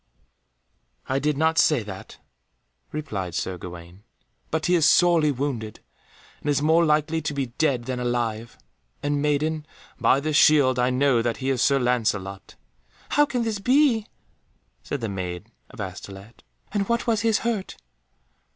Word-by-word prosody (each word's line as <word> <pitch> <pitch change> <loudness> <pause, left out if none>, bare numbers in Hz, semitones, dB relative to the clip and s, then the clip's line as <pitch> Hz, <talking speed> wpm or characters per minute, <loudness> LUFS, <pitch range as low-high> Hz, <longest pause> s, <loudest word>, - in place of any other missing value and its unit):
"I 135 +1 0
did 150 0 0
not 160 +1 +2
say 145 -8 +3
that," 95 -2 -10 0.7
replied 100 - -4
Sir 90 -1 -3
Gawaine, 85 +2 -10 0.5
"but 160 0 -1
he 180 - +2
is 165 -3 +5
sorely 170 -4 +4
wounded, 125 -6 -4 0.6
and 145 - -3
is 145 - +2
more 160 +3 +3
likely 155 +1 +1
to 150 -1 -3
be 130 -4 -3
dead 140 -7 +1
than 125 0 -4
alive. 120 -2 -2 0.5
And, 145 0 0
maiden, 150 +1 0 0.4
by 135 - +4
this 155 +1 -2
shield 140 -5 +5
I 125 +1 +2
know 130 -1 +2
that 115 -1 -1
he 130 +4 -1
is 130 - 0
Sir 140 0 +4
Lancelot." 110 -6 -1 0.5
"How 295 0 +3
can 245 -3 -1
this 220 -3 -2
be?" 250 -1 +3 0.7
said 140 - -5
the 115 - -2
Maid 90 -3 -5 0.2
of - - -15
Astolat, 100 +3 -8 0.3
"and 200 0 -1
what 235 0 0
was 225 -3 +1
his 225 -1 +2
hurt?" 220 -5 -2
140 Hz, 155 wpm, -24 LUFS, 115-160 Hz, 0.7 s, is